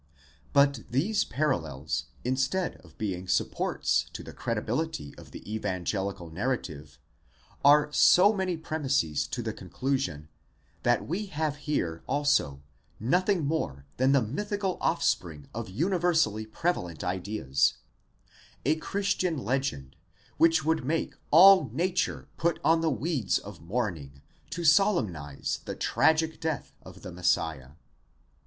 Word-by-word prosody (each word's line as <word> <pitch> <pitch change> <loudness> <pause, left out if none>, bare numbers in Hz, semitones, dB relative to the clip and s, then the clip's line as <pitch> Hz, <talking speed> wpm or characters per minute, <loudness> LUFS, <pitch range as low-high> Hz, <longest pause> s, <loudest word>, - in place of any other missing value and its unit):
® - - -38 0.5
But 140 -2 +4
these 185 - +1
parallels, 75 - -2 0.2
instead 130 +9 0
of - - -19
being 95 -4 -3
supports - - 0
to - - -7
the - - -10
credibility 115 - -3
of - - -13
the - - -11
evangelical 95 -3 -3
narrative, 80 - -4 0.7
are 145 +1 +6
so 200 +4 +6
many 190 -4 -1
premises 140 - -1
to - - -4
the - - -3
con - - -12
clusion, 90 - -2 0.5
that - - +1
we 200 +7 -2
have 155 -4 -2
here 85 - -1
also 135 - +1 0.4
nothing 180 - +1
more 70 - -2
than 130 +2 +3
the 135 -3 +4
mythical 200 - -2
offspring 80 -5 0
of - - -5
uni 170 - 0
versally 160 -12 +1
prevalent 95 - -2
ideas,—a 95 - -2
Christian 185 -2 -1
legend, 130 - -2 0.4
which 165 -3 +4
would 160 -3 +1
make 160 +5 -1 0.2
all 190 +4 +8
nature 180 +2 -1
put 170 0 0
on 165 0 +4
the 165 - +2
weeds 135 - 0
of - - -10
mourning 85 - -4 0.3
to 175 - -4
solemnize 130 - +2
the - - -4
tragic 160 0 +2
death 160 -2 -3
of - - -13
the 90 - -7
Messiah.!? 80 -6 -1
130 Hz, 125 wpm, -28 LUFS, -, 0.7 s, all